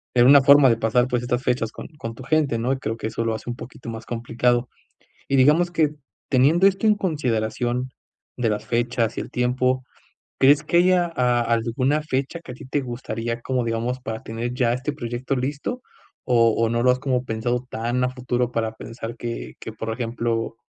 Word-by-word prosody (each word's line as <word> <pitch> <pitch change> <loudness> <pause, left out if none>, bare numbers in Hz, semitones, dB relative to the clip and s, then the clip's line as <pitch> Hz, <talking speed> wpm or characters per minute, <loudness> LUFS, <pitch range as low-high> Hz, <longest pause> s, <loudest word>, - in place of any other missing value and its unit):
en 120 -1 +6
una 140 +2 +8
forma 140 0 +7
de 115 - +3
pasar, 115 +2 +2
pues, 125 -1 0
estas 125 +1 -1
fechas 115 -3 0
con - - -9
con 115 -4 -6
tu 130 - -10
gente, 145 -4 +1
¿no? 125 +4 0
Y - - -2
creo 115 -2 -3
que 110 - -3
eso 115 +1 -3
lo 115 -1 0
hace 110 +2 -7
un 120 - -3
poquito 125 -1 -10
más 115 0 -7
complicado. 120 +1 0 0.6
Y, 135 - +1
digamos 150 +7 +4
que, 155 -3 +1 0.3
teniendo 150 +9 +5
esto 195 +3 0
en 210 - +5
consideración, 125 - -1 0.5
de 115 -3 +2
las 105 +1 -4
fechas 120 -1 0
y - - -1
el - - -9
tiempo, 125 +1 +1 0.6
¿crees 145 +3 +5
que 170 +3 +2
haya 180 0 +4
a 125 -3 +2
alguna 120 +6 0
fecha 140 +2 -2
que 170 - -12
a - - -8
ti - - -12
te 140 +2 0
gustaría, 120 -2 -4
como, 130 -2 -1
digamos, 115 +2 -2
para 110 -2 -5
tener 115 +2 -4
ya 120 -2 +2
este 130 +4 -2
proyecto 130 0 -3
listo, 145 - -3 0.4
o 115 -3 +4
o 115 0 +2
no 115 +1 0
lo 125 - +5
has 125 - +2
como 130 -2 -1
pensado 120 +2 -2
tan 120 +3 -1
a - - +2
futuro 125 -1 -1
para 115 -2 -1
pensar 115 +1 -7
que 110 - -5
que, - - -7
por 115 0 -4
ejemplo, 115 -1 -2
125 Hz, 205 wpm, -23 LUFS, 115-135 Hz, 0.6 s, una